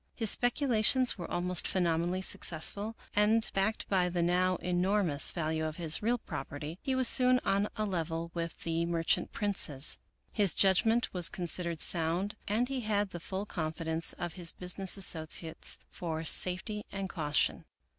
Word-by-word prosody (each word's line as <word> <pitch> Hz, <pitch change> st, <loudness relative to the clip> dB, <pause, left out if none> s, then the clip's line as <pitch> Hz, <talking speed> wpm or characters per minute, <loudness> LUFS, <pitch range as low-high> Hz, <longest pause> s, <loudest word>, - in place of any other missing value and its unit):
His 225 Hz, -4 st, +2 dB
speculations 245 Hz, -2 st, +1 dB
were 175 Hz, -, -7 dB
almost 175 Hz, 0 st, 0 dB
phenomenally 175 Hz, 0 st, -1 dB
successful, 200 Hz, +7 st, +3 dB, 0.2 s
and, 215 Hz, +2 st, +2 dB
backed 195 Hz, +3 st, -2 dB
by 185 Hz, -2 st, 0 dB
the 175 Hz, -1 st, -2 dB
now 180 Hz, +1 st, +1 dB
enormous 180 Hz, -3 st, +1 dB
value 160 Hz, -1 st, -3 dB
of 155 Hz, -1 st, -4 dB
his 160 Hz, -2 st, +1 dB
real 235 Hz, +3 st, 0 dB
property, 150 Hz, -, -8 dB
he 265 Hz, -2 st, -3 dB
was 260 Hz, -1 st, +3 dB
soon 255 Hz, 0 st, +5 dB
on 200 Hz, +1 st, 0 dB
a 215 Hz, -, -1 dB
level 165 Hz, -3 st, -4 dB
with 170 Hz, -1 st, -6 dB
the 165 Hz, 0 st, -2 dB
merchant 165 Hz, -1 st, 0 dB
princes. 155 Hz, -9 st, +1 dB, 0.3 s
His 205 Hz, -5 st, +2 dB
judgment 220 Hz, +5 st, +2 dB
was 175 Hz, -3 st, +4 dB
considered 170 Hz, -2 st, 0 dB
sound, 175 Hz, +6 st, +1 dB
and 225 Hz, +5 st, -1 dB
he 265 Hz, -1 st, -4 dB
had 205 Hz, -3 st, -2 dB
the 175 Hz, -, -7 dB
full 190 Hz, +4 st, -6 dB
confidence 160 Hz, -2 st, -3 dB
of 175 Hz, -2 st, -6 dB
his 175 Hz, -3 st, +2 dB
business 185 Hz, +2 st, +1 dB
associates 160 Hz, -3 st, +2 dB
for 160 Hz, -3 st, -6 dB
safety 190 Hz, +6 st, +2 dB
and 195 Hz, -1 st, -5 dB
caution. 150 Hz, -5 st, -1 dB
180 Hz, 155 wpm, -30 LUFS, 165-210 Hz, 0.3 s, soon